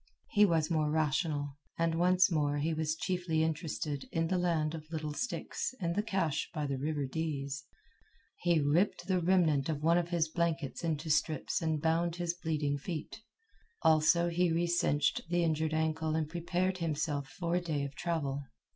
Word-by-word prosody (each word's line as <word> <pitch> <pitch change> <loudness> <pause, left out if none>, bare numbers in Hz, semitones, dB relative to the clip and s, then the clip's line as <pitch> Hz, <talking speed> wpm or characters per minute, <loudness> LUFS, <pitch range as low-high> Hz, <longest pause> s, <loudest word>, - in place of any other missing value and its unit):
He 210 0 +6
was 165 -2 +1
more 155 -2 +2
rational, 150 -2 0 0.2
and 165 0 +1
once 180 +3 +4
more 145 -2 +1
he 155 +3 0
was 155 0 -1
chiefly 175 -2 0
interested 155 -2 -3
in 165 0 0
the 185 - +1
land 165 -3 +1
of 155 -1 -8
little 155 -2 -3
sticks 250 +5 -3
and 170 -3 -1
the 205 - +1
cache 190 -8 -1
by 150 -1 -1
the 135 -2 -2
river 145 0 -1
Dease. 140 -2 -3 0.7
He 170 -2 +3
ripped 155 +7 +2
the 185 -2 +1
remnant 165 -5 +3
of 150 -2 -2
one 170 +2 +4
of 170 -1 -3
his 170 -2 +1
blankets 165 -2 -2
into 160 -1 -1
strips 150 0 +1
and 160 -2 0
bound 165 +1 +1
his 175 -1 -1
bleeding 155 -4 -1
feet. 165 +7 -6 0.6
Also, 160 +2 +4
he 175 0 +2
recinched 165 -4 +1
the 175 0 +2
injured 155 -1 0
ankle 160 0 0
and 160 -1 0
prepared 175 +3 -1
himself 150 -3 -1
for 170 0 -3
a 180 - +2
day 155 -5 -2
of 140 0 -5
travel. 145 -3 -2
160 Hz, 175 wpm, -32 LUFS, 150-175 Hz, 0.7 s, He